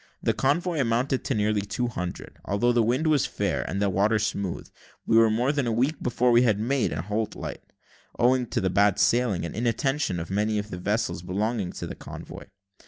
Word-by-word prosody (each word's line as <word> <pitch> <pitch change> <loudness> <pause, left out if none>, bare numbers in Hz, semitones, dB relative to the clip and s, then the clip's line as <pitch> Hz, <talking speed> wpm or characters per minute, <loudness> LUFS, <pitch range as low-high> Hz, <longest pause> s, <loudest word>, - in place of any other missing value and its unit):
The - - +2
convoy 160 +4 0
amounted 125 +2 0
to 135 - 0
nearly 105 0 +1
two 105 +5 -2
hundred. 90 -6 -6
Although 110 +5 +1
the 120 -1 +3
wind 125 +7 +1
was 155 -3 +3
fair, - - -1
and 95 +5 -2
the 100 - +2
water 100 +3 +2
smooth, 100 -3 -3 0.4
we - - +2
were 115 0 +6
more 120 +5 +1
than 145 -4 -1
a - - +1
week 130 +7 0
before 125 0 +1
we 120 0 +6
made 115 +2 0
Anholt 105 +8 -3
light, - - -6 0.6
owing 125 0 +3
to - - -1
the 95 -2 0
bad 100 0 +3
sailing 120 -8 +2
and - - -6
inattention 120 -1 0
of 85 - -6
many 105 +2 0
of 105 +1 -4
the 90 - -5
vessels 105 -1 -1
belonging 100 +2 -2
to - - -6
the - - -6
convoy. - - -9
110 Hz, 200 wpm, -26 LUFS, 100-125 Hz, 0.6 s, were